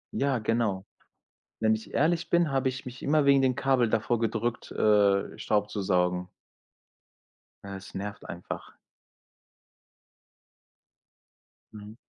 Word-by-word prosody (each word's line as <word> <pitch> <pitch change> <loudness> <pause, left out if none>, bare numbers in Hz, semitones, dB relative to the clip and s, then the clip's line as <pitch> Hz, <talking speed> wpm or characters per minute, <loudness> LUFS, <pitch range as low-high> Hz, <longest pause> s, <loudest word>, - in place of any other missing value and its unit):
Ja, 140 -2 +1
genau. 110 -3 -1 0.8
Wenn 110 0 +3
ich 110 - -7
ehrlich 165 +3 +1
bin, 170 -3 +3
habe 135 -1 +1
ich 130 0 -8
mich 125 +1 -9
immer 150 0 +2
wegen 140 -1 +5
dem 130 -1 +2
Kabel 130 -4 +2
davor 115 +1 +1
gedrückt, 115 +1 -2
äh, 100 -2 +2
Staub 105 -1 0
zu 105 - -3
saugen. 90 -1 0 1.3
Ja, 100 0 -6
es 95 - -12
nervt 100 +1 -6
einfach. 85 +1 -7 3.0
Mhm. 105 +1 -10
110 Hz, 120 wpm, -28 LUFS, 100-135 Hz, 3.0 s, wegen